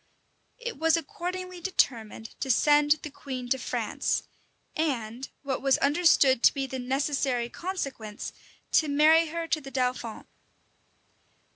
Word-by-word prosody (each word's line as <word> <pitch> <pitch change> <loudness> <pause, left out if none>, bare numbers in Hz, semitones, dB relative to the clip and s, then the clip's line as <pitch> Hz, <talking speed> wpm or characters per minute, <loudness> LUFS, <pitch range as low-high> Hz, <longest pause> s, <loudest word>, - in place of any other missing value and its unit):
It 480 - -6
was 325 +1 +4
accordingly 365 -1 -5
determined 225 - -1
to 270 - -3
send 295 +3 +5
the 305 - -6
queen 255 -3 -6
to 265 - +1
France; - - -1 0.5
and, 255 -5 -2
what 270 -2 -2
was 270 -1 +3
understood 285 -4 +4
to - - +6
be 275 -1 -1
the 265 0 -5
necessary 265 -2 0
consequence, 275 - -5 0.4
to 310 - +4
marry 310 +3 +5
her 335 +1 -4
to 315 -1 0
the 270 - -9
dauphin. 250 -3 -2
280 Hz, 130 wpm, -27 LUFS, 255-325 Hz, 0.5 s, to